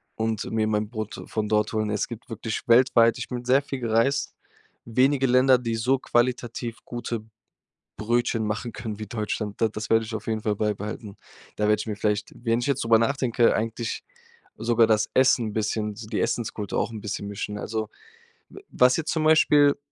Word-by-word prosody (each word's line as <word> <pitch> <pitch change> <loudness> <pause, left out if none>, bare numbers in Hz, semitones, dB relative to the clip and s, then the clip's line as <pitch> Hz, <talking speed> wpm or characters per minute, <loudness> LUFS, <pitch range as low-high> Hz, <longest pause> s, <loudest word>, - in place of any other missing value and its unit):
und 110 -1 -2
mir 110 -1 +1
mein 105 -1 0
Brot 110 -1 -5
von 105 -1 -2
dort 105 0 +1
holen. 110 -1 0
Es 105 - -1
gibt 120 -1 -9
wirklich 110 -1 -4
weltweit- 115 -1 +5
ich - - -4
bin 125 -1 -5
sehr 130 +3 +4
viel 135 -1 -5
gereist- 115 +5 +1 0.5
wenige 130 +3 +2
Länder, 130 +1 +5
die 115 -2 -2
so 125 +4 +1
qualitativ 120 -1 -1
gute 120 -2 -4 0.8
Brötchen 115 0 0
machen 110 +3 -3
können 110 -2 -6
wie 110 - -5
Deutschland. 105 -1 -4
Da 115 - +3
das 105 0 -6
werde 115 0 +4
ich 110 - -6
auf 110 0 -5
jeden 110 -1 -1
Fall 105 -2 0
beibehalten. 105 0 -3 0.4
Da 105 - -1
werde 105 0 +3
ich - - -5
mir 105 -2 -3
vielleicht, 105 0 -1
wenn 115 0 0
ich - - -2
jetzt 140 -3 0
drüber 115 -1 +5
nachdenke, 120 -1 +2
eigentlich 115 +1 -3 0.6
sogar 115 0 +3
das 110 -1 +2
Essen 125 -4 +3
'n - - -8
bisschen, 105 0 -1
so 110 -1 -9
die 110 - -2
Essenskultur 110 -3 -2
auch - - -1
'n 110 -2 -7
bisschen 100 0 -4
mischen. 105 0 -5
Also, 110 -1 -3 0.6
w 395 - -12
was 125 0 +4
jetzt 160 -1 -2
zum 160 -2 0
Beispiel 150 -2 +5
115 Hz, 195 wpm, -25 LUFS, 105-120 Hz, 0.8 s, weltweit